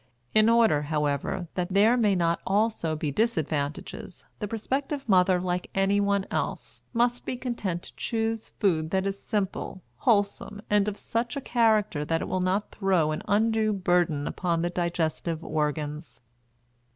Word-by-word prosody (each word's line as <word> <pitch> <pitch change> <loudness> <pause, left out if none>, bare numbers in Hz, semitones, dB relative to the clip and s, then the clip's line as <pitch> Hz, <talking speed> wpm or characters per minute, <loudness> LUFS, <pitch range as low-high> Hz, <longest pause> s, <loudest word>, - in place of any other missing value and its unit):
In 215 +1 +5
order, 230 -10 +4
however, 150 +3 -1
that 180 0 -2
there 210 +5 +5
may 215 -5 +3
not 170 -1 +1
also 200 -5 +1
be 150 -1 -2
disadvantages, 155 -3 -2
the 210 - -3
prospective 270 +6 -3
mother, 185 -2 +4
like 180 0 -2
anyone 200 0 +2
else, - - -3
must 240 0 +1
be 255 - -4
content 210 -9 -3
to - - -11
choose 225 -1 -2
food 160 -6 +1
that 190 +2 0
is 195 0 -3
simple, 195 -3 -3
wholesome, 205 -2 0
and 210 0 +3
of 210 -1 -2
such 235 +4 -2
a - - 0
character 220 - +2
that 165 +2 -1
it - - -5
will 185 - -1
not 185 +3 0
throw 185 -6 +1
an 155 - -3
undue 220 +1 +2
burden 175 -6 +1
upon 170 -2 -1
the 175 - -1
digestive 170 -1 -2
organs. 150 -4 -3
190 Hz, 150 wpm, -27 LUFS, 165-220 Hz, -, In